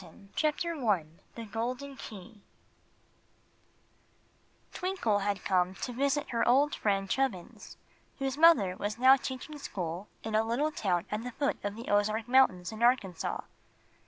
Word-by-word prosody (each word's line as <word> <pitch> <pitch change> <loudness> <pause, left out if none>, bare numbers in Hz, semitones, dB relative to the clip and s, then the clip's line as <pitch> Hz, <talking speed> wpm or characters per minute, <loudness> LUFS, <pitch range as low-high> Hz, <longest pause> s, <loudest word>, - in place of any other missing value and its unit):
381 190 +3 -16
Chapter 310 -1 -1
I 200 -8 +2 0.3
The 230 - -6
Golden 250 +5 -3
Key 215 -3 -11 2.3
TWINKLE 360 - 0
had 200 -1 -2
come 185 0 +1
to 250 - -5
visit 280 +3 0
her 235 - +1
old 275 +5 +4
friend 195 -2 0
Chubbins, 245 -6 -3 0.4
whose 270 -1 -2
mother 285 - +5
was 210 +2 -3
now 260 +2 +7
teaching 275 +3 -6
school 180 - -5 0.2
in 220 - -4
a 215 +1 +3
little 250 +7 0
town 180 - -1
at 210 +1 -2
the 250 - -5
foot 280 +3 0
of 205 0 -3
the 230 +2 -8
Ozark 215 +2 +1
Mountains, 240 -9 +3
in 220 +1 -8
Arkansas. 235 -8 +1
225 Hz, 145 wpm, -30 LUFS, 200-270 Hz, 2.3 s, now